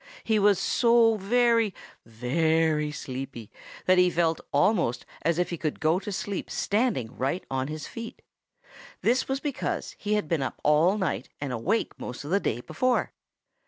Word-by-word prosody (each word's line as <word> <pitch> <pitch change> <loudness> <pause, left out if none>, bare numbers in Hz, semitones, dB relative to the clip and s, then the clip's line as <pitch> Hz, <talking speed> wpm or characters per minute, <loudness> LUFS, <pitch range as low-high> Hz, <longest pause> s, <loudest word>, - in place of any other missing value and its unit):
He 220 -1 +2
was 205 -1 +5
so 230 0 +4
very, 230 0 +2 0.3
very 150 +6 +1
sleepy 130 -5 -7 0.3
that 185 0 +5
he 180 0 +5
felt 165 -2 +1
almost 140 - +2 0.2
as 165 +1 +1
if 180 0 0
he 170 - -4
could 155 -2 -2
go 160 +4 +2
to 205 - -6
sleep 195 0 -4
standing 205 - 0
right 140 +8 -1
on 130 0 -1
his 155 0 -5
feet. 230 0 -8 0.8
This 245 +3 +2
was 270 0 -1
because 285 -2 -3
he 210 0 0
had 210 -7 -1
been 160 -2 0
up 135 - -4
all 160 +7 +4
night 140 - -2
and 140 -3 -3
awake 175 - -1
most 125 - -6
of 145 - -7
the 200 - +4
day 120 - -2
before. 245 - 0
170 Hz, 165 wpm, -27 LUFS, 140-210 Hz, 0.8 s, was